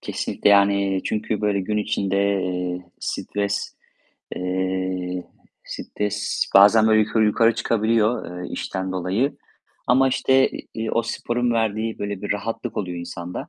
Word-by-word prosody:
kesinlikle. -, -, 0 dB
Yani, 100 Hz, -1 st, +3 dB
çünkü 110 Hz, -1 st, -2 dB
böyle 100 Hz, -2 st, +1 dB
gün 105 Hz, +3 st, -2 dB
içinde, 100 Hz, -2 st, -1 dB, 0.3 s
eee, 90 Hz, 0 st, -3 dB, 0.2 s
stres, 100 Hz, 0 st, -3 dB, 0.6 s
eee, 95 Hz, 0 st, -2 dB, 0.4 s
stres 105 Hz, 0 st, -3 dB
bazen 105 Hz, +3 st, +7 dB
böyle 110 Hz, 0 st, +5 dB
yukarı 110 Hz, +1 st, +2 dB
yukarı 115 Hz, +2 st, +3 dB
çıkabiliyor, 110 Hz, -4 st, 0 dB
eee, -, -, -7 dB
işten 95 Hz, 0 st, -3 dB
dolayı. 95 Hz, +9 st, -1 dB, 0.5 s
Ama 135 Hz, +2 st, +4 dB
işte, 135 Hz, 0 st, +3 dB
iii, -, -, -9 dB
eee, 110 Hz, 0 st, -3 dB
o 115 Hz, -, +1 dB
sporun 120 Hz, +1 st, -1 dB
verdiği 110 Hz, 0 st, -1 dB
böyle 100 Hz, -1 st, -4 dB
bir 105 Hz, -, 0 dB
rahatlık 115 Hz, +3 st, -4 dB
oluyor 90 Hz, -3 st, -3 dB
insanda. 85 Hz, +1 st, -6 dB
105 Hz, 135 wpm, -23 LUFS, 95-110 Hz, 0.6 s, bazen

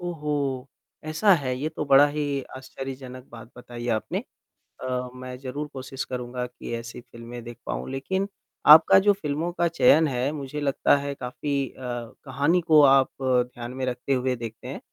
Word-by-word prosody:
ओहो! 145 Hz, -6 st, -2 dB, 0.4 s
ऐसा 155 Hz, +7 st, +3 dB
है? 135 Hz, -6 st, -2 dB
ये 150 Hz, +4 st, -1 dB
तो 155 Hz, -1 st, -4 dB
बड़ा 140 Hz, 0 st, +7 dB
ही 145 Hz, -2 st, -2 dB
आश्चर्यजनक 130 Hz, -1 st, -8 dB
बात 115 Hz, 0 st, -11 dB
बताई 120 Hz, -1 st, -8 dB
आपने। 110 Hz, -, -3 dB, 0.6 s
अ, 125 Hz, -1 st, -2 dB
मैं 130 Hz, 0 st, -7 dB
ज़रूर 140 Hz, +3 st, -5 dB
कोशिश 135 Hz, 0 st, -5 dB
करूँगा 125 Hz, 0 st, -4 dB
कि 125 Hz, -, -10 dB
ऐसी 115 Hz, +1 st, -7 dB
फ़िल्में 120 Hz, 0 st, -10 dB
देख 120 Hz, 0 st, -9 dB
पाऊँ, -, -, -4 dB
लेक़िन 190 Hz, +9 st, -2 dB, 0.4 s
आपका 155 Hz, +5 st, +9 dB
जो 205 Hz, +1 st, +4 dB
फ़िल्मों 165 Hz, -2 st, -3 dB
का 175 Hz, 0 st, +1 dB
चयन 160 Hz, 0 st, +5 dB
है, 130 Hz, 0 st, -1 dB
मुझे 150 Hz, 0 st, -5 dB
लगता 140 Hz, 0 st, +3 dB
है 140 Hz, 0 st, -3 dB
काफ़ी 135 Hz, +2 st, -3 dB
अ, -, -, -18 dB, 0.5 s
कहानी 145 Hz, +6 st, +1 dB
को 160 Hz, -2 st, +6 dB
आप 135 Hz, -1 st, +6 dB
ध्यान 125 Hz, -1 st, 0 dB
में 130 Hz, 0 st, -3 dB
रखते 125 Hz, +2 st, -2 dB
हुए 130 Hz, 0 st, 0 dB
देखते 115 Hz, -2 st, -8 dB
हैं। -, -, -6 dB
135 Hz, 170 wpm, -25 LUFS, 125-150 Hz, 0.6 s, आपका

